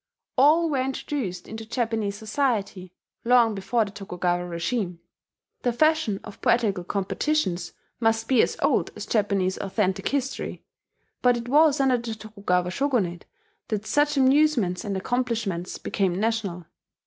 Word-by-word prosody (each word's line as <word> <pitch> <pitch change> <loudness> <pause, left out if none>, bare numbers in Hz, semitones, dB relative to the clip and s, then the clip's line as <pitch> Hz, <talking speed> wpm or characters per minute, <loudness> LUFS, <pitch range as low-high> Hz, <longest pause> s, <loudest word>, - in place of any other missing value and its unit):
All 305 +5 +5
were 280 -4 0
introduced 255 -8 -3
into 220 +1 -7
Japanese 220 -3 -2
society 210 -5 -2 0.3
long 235 -2 +4
before 215 +3 0
the 200 - -8
Tokugawa 180 -3 -2
regime; 175 +1 -2 0.6
the 245 - +1
fashion 310 -6 +2
of 210 - -11
poetical 210 -6 +2
competitions 190 - -1 0.3
must 225 -1 +1
be 255 -4 +5
as - - 0
old - - +2
as - - -6
Japanese 200 -4 0
authentic 195 -1 -1
history. 275 -1 -3 0.6
But 245 -1 +4
it 235 0 -6
was 295 +2 +4
under 260 -2 +3
the 230 -1 -5
Tokugawa 200 -5 -1
Shogunate 200 -8 -1 0.4
that 215 -1 -3
such 295 +4 +2
amusements 265 -9 +3
and 200 -3 -2
accomplishments 220 -5 -2
became 190 -2 -1
national. 205 -6 -1
220 Hz, 135 wpm, -25 LUFS, 190-255 Hz, 0.6 s, All